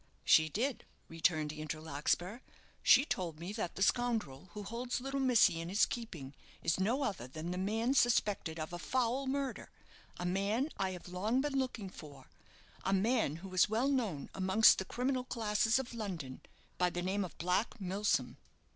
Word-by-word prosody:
"She 160 0 +6
did," 245 - -1 0.3
returned 155 -2 +1
Andrew 155 0 -5
Larkspur. 160 - -1 0.4
"She 265 +3 +6
told 170 - -3
me 175 +4 -5
that 210 -6 -3
the 190 - +1
scoundrel 215 - 0
who 210 -1 -6
holds 235 +5 -3
little 270 +2 -3
missy 245 -10 +4
in 165 - -5
his 200 +3 +4
keeping 165 - -6 0.3
is 165 - +1
no 235 +9 +1
other 190 - -3
than 155 +6 -6
the 180 - -3
man 225 +6 0
suspected 205 -10 +2
of 155 +2 -5
a 175 - -4
foul 255 +5 0
murder 275 0 -2 0.5
a 175 - -4
man 200 - 0
I 190 - 0
have 180 - -9
long 210 +8 0
been 290 0 -2
looking 255 -8 -2
for 140 -6 -12 0.6
a 195 - +1
man 215 - +2
who 190 - -9
is 185 - +4
well 230 +6 +1
known 220 - -1
amongst 190 +4 +5
the 190 - -3
criminal 255 +4 -1
classes 225 -1 +1
of 260 -2 -4
London 175 - -5 0.4
by 180 0 +3
the 175 0 -4
name 195 +2 0
of 180 - -8
Black 180 +8 0
Milsom." 195 +2 0
200 Hz, 175 wpm, -34 LUFS, 175-240 Hz, 0.6 s, She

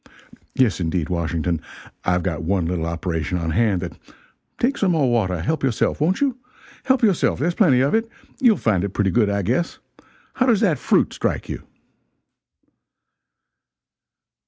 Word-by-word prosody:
Yes 125 -8 +2
indeed, 85 -2 -1
Washington, 85 -1 -1 0.4
I've 90 -1 +1
got 85 -6 -2
one 90 +1 0
little 85 -1 -2
operation 85 -1 -2
on 80 -2 -2
hand 100 0 +1
that 85 -2 -7 0.6
take 265 +4 +1
some 190 -3 +2
more 140 -6 +2
water 95 -7 0
help 155 - -1
yourself, 130 +2 0
won't 180 - +1
you? 265 -3 0 0.5
help 260 -2 +2
yourself, 200 -6 +2
there's 170 +4 0
plenty 145 - +4
of 140 - +1
it. 225 +1 +1 0.3
You'll 240 -7 +4
find 100 - +1
it 100 -1 -4
pretty 100 -2 +1
good, 105 +2 +2
I 100 0 -1
guess. 130 - -1 0.6
How 255 - +1
does 225 -5 +3
that 180 -9 +2
fruit - - +2
strike - - -2
you?" - - -6
105 Hz, 160 wpm, -22 LUFS, -, 0.6 s, plenty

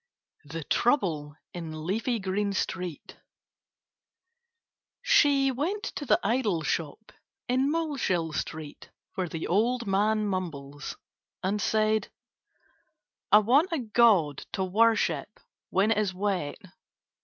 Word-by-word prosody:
THE 160 +3 -6
TROUBLE 155 - +1 0.2
IN 160 -3 -6
LEAFY 225 +6 0
GREEN 200 +1 -1
STREET 180 -4 -4 1.9
She 285 - +4
went 345 - -2
to 290 - -5
the - - +4
idol 210 -7 +1
shop 165 +7 -3 0.4
in 260 +3 +2
Moleshill 270 - -1
Street, 155 -1 -6 0.2
where 185 -2 -2
the 165 0 -4
old 235 +6 +1
man 210 +2 +1
mumbles, 150 -7 -4 0.5
and 200 +3 0
said: 215 +1 +1 1.2
"I - - +9
want 260 - +4
a 330 - 0
god 215 - +3
to 190 - -1
worship 220 +4 +1 0.3
when 200 +3 +2
it 215 - +2
is 195 -3 -1
wet." 190 -6 -1
205 Hz, 110 wpm, -28 LUFS, 170-235 Hz, 1.9 s, I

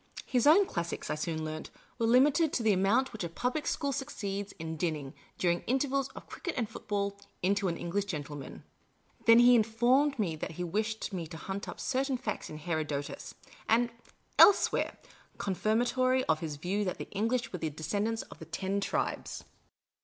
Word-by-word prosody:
His 250 +1 +2
own 370 +7 +7
classics, 170 - -3
I - - +2
soon 155 +1 -2
learnt, 155 0 -5 0.3
were 230 - +2
limited 285 +6 +5
to 235 - 0
the 215 -2 +4
amount 210 +8 +2
which 220 - -5
a 170 - -3
public 250 - -2
school 280 -3 0
succeeds 205 -8 -4
in 160 -2 -5
dinning, 150 -4 -2 0.2
during 175 -1 +2
the - - -20
intervals 270 +1 +1
of - - -9
cricket 355 - -5
and 235 -4 0
football, 205 -3 -3 0.2
into 200 +1 +2
an 170 -2 -1
English 195 +4 -1
gentle 150 -6 -5
man. 140 -2 -9 0.6
Then 230 0 +9
he 240 +1 +8
informed 240 +5 +3
me 185 -8 0
that 155 - -5
he 180 - -4
wished 215 +4 -2
me 170 -3 -3
to 160 - -8
hunt 195 +5 -5
up - - -8
certain 270 0 0
facts 255 - -4
in 155 - -7
Herodotus 155 - -3 0.2
" - - -18
and 235 +1 +3 0.5
elsewhere 405 - +6 0.2
" - - -30
confirmatory 245 +6 +2
of 155 - +1
his 155 -3 -4
view 185 +8 -1
that 185 - -2
the - - -6
English 230 +5 -1
were 180 - -3
the 160 - -1
descendants 205 +9 -2
of - - -14
the - - -8
Ten 195 +1 -2
Tribes. - - -2
205 Hz, 190 wpm, -31 LUFS, 170-245 Hz, 0.6 s, Then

